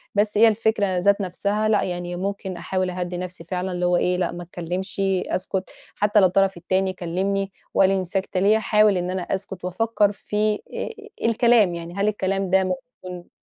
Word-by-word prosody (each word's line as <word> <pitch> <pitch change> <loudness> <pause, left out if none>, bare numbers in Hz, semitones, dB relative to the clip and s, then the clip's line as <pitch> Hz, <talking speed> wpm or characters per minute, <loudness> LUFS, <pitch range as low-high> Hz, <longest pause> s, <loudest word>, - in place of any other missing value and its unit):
بَس 205 0 +2
هي 230 - +7
الفكرة 215 -3 +1
ذات 200 +3 +3
نَفْسها 200 +3 -1
لأ، 215 - +3
يعني 175 -1 -4
ممكن 190 0 -4
أحاول 185 +2 -1
أهدِّي 180 0 -4
نَفْسي 180 -1 -5
فعلًا 180 +2 -3
اللي 180 0 -1
هو 175 0 +3
إيه 180 +1 +1
لأ، 180 -1 0
ما 175 - -7
اتكلمشي 185 +2 -2
أسكت 185 0 -3 0.3
حتى 210 +1 +3
لو 195 - +6
الطرف 195 +1 +2
التاني 185 +2 0
كلّمني 195 +3 -2 0.2
وقال 190 - +5
لي 195 - +2
أنتِ 185 - -4
ساكتة 190 0 -1
ليه؟ 205 +3 +4
أحاول 210 -2 +3
إن 180 +1 -2
أنا 185 - -2
أسكت 185 0 -4
وأفكّر 205 +2 +1
في 210 +1 -1
آآ، - - -8 0.6
آآ، - - 0
الكلام 230 -5 +4
يعني 170 0 -7
هل 200 +1 +1
الكلام 195 -2 -1
ده 190 0 +4
ممكن 185 -2 -6
190 Hz, 190 wpm, -23 LUFS, 180-205 Hz, 0.6 s, هي